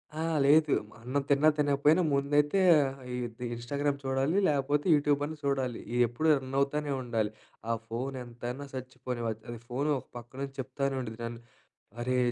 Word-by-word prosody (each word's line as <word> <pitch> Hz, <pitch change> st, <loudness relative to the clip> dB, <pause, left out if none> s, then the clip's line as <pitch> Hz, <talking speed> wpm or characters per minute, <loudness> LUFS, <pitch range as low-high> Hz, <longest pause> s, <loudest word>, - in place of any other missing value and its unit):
ఆ! -, -, -4 dB, 0.3 s
లేదు 150 Hz, +1 st, +5 dB, 0.2 s
మ -, -, -19 dB
అన్నం 135 Hz, +3 st, -1 dB
తిన్నా 145 Hz, +2 st, +5 dB
తినకపోయినా 145 Hz, +3 st, +4 dB
ముందైతే 145 Hz, +5 st, +2 dB, 0.2 s
ఆహ్, 135 Hz, 0 st, -4 dB, 0.2 s
ఇది 120 Hz, 0 st, -4 dB
ఇన్‌స్టాగ్రామ్ 140 Hz, +4 st, -1 dB
చూడాలి 135 Hz, +7 st, +1 dB
లేపోతే, 145 Hz, 0 st, +1 dB
యూట్యూబన్నా 145 Hz, +1 st, +1 dB
చూడాలి. 130 Hz, -4 st, 0 dB, 0.2 s
ఇయ్యెప్పుడు 120 Hz, +6 st, +2 dB
రన్ 130 Hz, +1 st, -6 dB
అవుతానే 145 Hz, +1 st, 0 dB
ఉండాలి. 115 Hz, -4 st, -1 dB, 0.4 s
ఆ -, -, +3 dB, 0.2 s
ఫోన్ 130 Hz, +4 st, -3 dB
ఎంతైనా 120 Hz, +3 st, -6 dB
సచ్చిపోనివ్ 125 Hz, -2 st, -4 dB
అద్ 110 Hz, 0 st, -8 dB
అది 120 Hz, -2 st, -6 dB
ఫోను 140 Hz, +5 st, 0 dB
ఒక -, -, -17 dB
పక్కనుంచి 135 Hz, +3 st, -7 dB
చెప్తానే 135 Hz, +1 st, -2 dB
ఉండిది 115 Hz, -2 st, -7 dB
నన్ను 115 Hz, 0 st, -6 dB, 0.6 s
అరే 125 Hz, +1 st, 0 dB
135 Hz, 150 wpm, -30 LUFS, 120-145 Hz, 0.6 s, లేదు